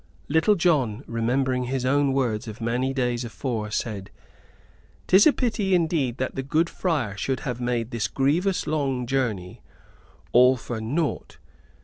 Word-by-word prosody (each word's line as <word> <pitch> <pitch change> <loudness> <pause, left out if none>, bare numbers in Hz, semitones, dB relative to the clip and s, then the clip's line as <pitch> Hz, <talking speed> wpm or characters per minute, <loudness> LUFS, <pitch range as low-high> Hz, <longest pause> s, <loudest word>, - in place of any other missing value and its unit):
Little 160 +7 +3
John, 140 - +1
remembering 125 +2 0
his 130 0 -2
own 140 +1 +2
words 120 -4 -1
of 110 0 -8
many 120 +3 -1
days 125 -2 -1
afore, 115 -2 -4
said: 105 -3 -3 1.0
"'Tis 190 +7 +6
a - - +7
pity 210 -8 0
indeed 160 -8 0
that 130 - -2
the 135 - -3
good 155 +5 0
friar 145 - -1
should 130 +6 -2
have 125 -2 -4
made 120 -1 -1
this 115 -2 -1
grievous 170 +8 +1
long 135 -5 -1
journey 115 -9 -2 0.7
all 125 +2 +6
for 120 -1 -5
naught! 145 +8 -2
130 Hz, 145 wpm, -25 LUFS, 120-150 Hz, 1.0 s, a